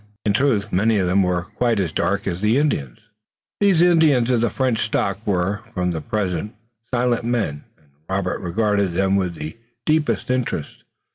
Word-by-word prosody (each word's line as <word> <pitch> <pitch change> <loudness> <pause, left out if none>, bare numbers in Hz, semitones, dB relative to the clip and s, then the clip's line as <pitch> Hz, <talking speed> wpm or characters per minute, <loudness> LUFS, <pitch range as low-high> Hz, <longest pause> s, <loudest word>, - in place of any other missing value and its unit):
In 105 - +2
truth, 110 -4 +1
many 110 +4 +3
of 95 - +1
them 90 +2 +3
were 90 -2 0
quite 110 +3 -1
as 90 -5 -1
dark 100 +5 -1
as 90 -1 -3
the 110 +4 +3
Indians. 70 - 0 0.6
These 195 -5 +4
Canadians 155 -8 +4
of 120 -2 +2
the 120 - +2
French 130 -2 0
stock 100 -3 -1
were, 95 +1 0
for 90 -1 -1
the 80 -2 -3
present, 105 -1 -2 0.4
silent 120 -1 +1
men, 110 -12 -2
and 75 -2 -30 0.2
Robert 95 -1 -1
regarded 100 +1 0
them 95 +1 +2
with 90 -3 0
the 80 +6 -7 0.3
deepest 155 -4 +1
interest. 120 - -3
105 Hz, 170 wpm, -21 LUFS, 90-120 Hz, 0.6 s, These